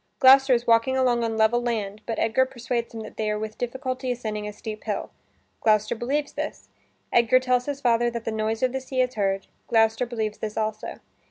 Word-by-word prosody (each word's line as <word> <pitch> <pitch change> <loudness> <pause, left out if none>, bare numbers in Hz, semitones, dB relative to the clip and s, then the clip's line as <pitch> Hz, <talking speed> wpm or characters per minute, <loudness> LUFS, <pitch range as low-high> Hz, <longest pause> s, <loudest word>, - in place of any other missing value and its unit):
Gloucester 265 0 +7
is 235 0 -2
walking 230 +3 +3
along 245 -2 +2
on 225 -1 -1
level 220 +2 +3
land 215 -4 -3
but 225 - -2
Edgar 225 +4 +3
persuades 240 -2 -3
him 225 - -7
that 215 - -10
they 215 -1 -1
are 210 - 0
with 215 0 -6
difficulty 255 +1 -3
ascending 215 -4 -4
a - - -4
steep 215 +1 -8
hill. 210 -2 -3 0.5
Gloucester 215 -1 +3
believes 275 +6 -2
this. - - -5 0.4
Edgar 235 +2 +5
tells 250 0 +1
his 285 -1 -4
father 240 -1 +3
that 235 -1 -6
the 225 - -1
noise 220 +2 -2
of 255 - +3
the 265 - -2
sea 260 0 -1
is 250 0 0
heard; 195 -3 -1 0.2
Gloucester 225 +1 +3
believes 220 -3 -3
this 215 -1 -5
also. 215 0 -3
235 Hz, 205 wpm, -25 LUFS, 220-255 Hz, 0.5 s, Gloucester